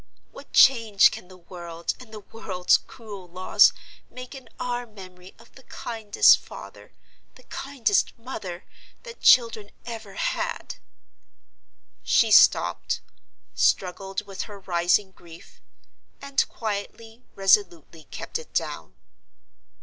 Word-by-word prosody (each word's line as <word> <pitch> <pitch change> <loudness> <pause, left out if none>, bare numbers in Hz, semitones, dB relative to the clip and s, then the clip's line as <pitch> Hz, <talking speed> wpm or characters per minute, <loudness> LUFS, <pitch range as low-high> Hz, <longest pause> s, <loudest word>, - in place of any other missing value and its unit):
What - - -14
change 230 -6 +5
can - - -9
the 185 0 -15
world, 170 -1 -6
and 250 -4 -14
the 215 -1 -9
world's 190 -4 0
cruel 205 -6 -12
laws 185 +2 +4 0.4
make 255 +1 -10
in 265 -2 -12
our 245 -1 -3
memory 185 -3 -14
of 230 +1 -20
the 265 - -16
kindest 225 -5 +3
father, - - -13 0.4
the - - -18
kindest 275 - -1
mother, 210 -7 -8 0.4
that 480 -1 -11
children 230 -4 +4 0.2
ever 225 -4 -8
had!" - - -3 1.2
She - - +2
stopped: - - +4 0.5
struggled 195 +2 0
with 195 -1 -6
her 205 -1 -10
rising 180 +2 +1
grief; 170 -3 -16 0.6
and 280 0 -1
quietly, 225 +2 -6
resolutely, 175 -5 +1
kept - - -6
it 475 - -14
down. - - -3
205 Hz, 115 wpm, -25 LUFS, 185-235 Hz, 1.2 s, change